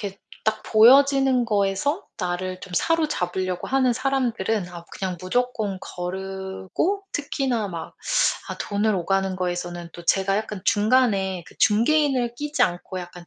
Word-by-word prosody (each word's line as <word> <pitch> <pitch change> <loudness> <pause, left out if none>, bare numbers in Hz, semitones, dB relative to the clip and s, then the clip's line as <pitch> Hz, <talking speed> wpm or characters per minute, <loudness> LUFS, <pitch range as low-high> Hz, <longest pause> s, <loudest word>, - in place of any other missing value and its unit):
이렇게 200 -1 -6 0.3
딱 215 0 0
보여지는 265 +2 +5
거에서 210 - 0
나를 185 0 -3
좀 185 - -10
사로잡으려고 185 - 0
하는 260 -2 +3
사람들은 235 -7 -1
아 170 -1 -9
그냥 185 -2 -4
무조건 215 0 -1
거르고 190 - -3
특히나 260 -6 -1
막 165 -3 -7 0.6
아 - - -4
돈을 210 +1 0
오가는 195 +1 0
거에서는 175 -1 -3
또 175 - -11
제가 195 +2 +2
약간 210 -3 -5
중간에 205 -5 +2
그 - - -15
중개인을 245 +2 +3
끼지 295 +4 -1
않고 180 +1 -1
약간 175 -1 -9
200 Hz, 310 characters per minute, -24 LUFS, 185-250 Hz, 0.6 s, 보여지는